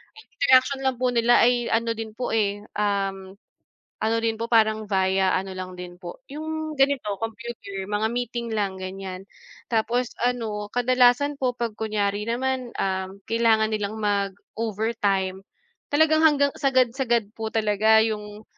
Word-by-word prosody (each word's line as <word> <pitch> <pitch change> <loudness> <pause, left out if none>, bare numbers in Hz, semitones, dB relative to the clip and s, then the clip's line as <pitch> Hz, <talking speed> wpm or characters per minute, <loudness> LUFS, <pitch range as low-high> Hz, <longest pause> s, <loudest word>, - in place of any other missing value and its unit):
ang 440 - -14
interaction 260 0 +4
lang 260 - +1
po 250 0 +1
nila 240 0 +4
ay 240 0 +3
ano 230 0 +1
din 220 -1 -7
po, 250 - -3
eh, 205 -2 0 0.2
um, 195 -2 -1 0.7
ano 220 +1 +2
din 225 -1 0
po 230 - -2
parang 220 -1 +3
via 190 -1 +2
ano 190 0 -3
lang 185 0 -6
din 175 0 -8
po, 175 +6 -9
'yong 315 +1 -4
ganito, 270 -7 +1
computer, 225 -4 -6
mga 210 +1 +1
meeting 240 -1 -3
lang, 195 -3 -1
ganiyan. 190 0 -7 0.4
Tapos 235 +2 0
ano, 220 -4 -1
kadalasan 250 +3 +3
po 255 -2 0
'pag 235 -2 -3
kunwari 210 -2 -1
naman, 255 +1 -1
um, 190 0 -2
kailangan 225 -1 +3
nilang 210 0 -2
mag-overtime, 200 -1 -1 0.5
talagang 315 +1 +4
hanggang 285 -2 +4
sagad-sagad 250 -4 +1
po 225 - -3
talaga 220 0 +4
'yong, 210 -1 -4
220 Hz, 140 wpm, -24 LUFS, 200-245 Hz, 0.7 s, interaction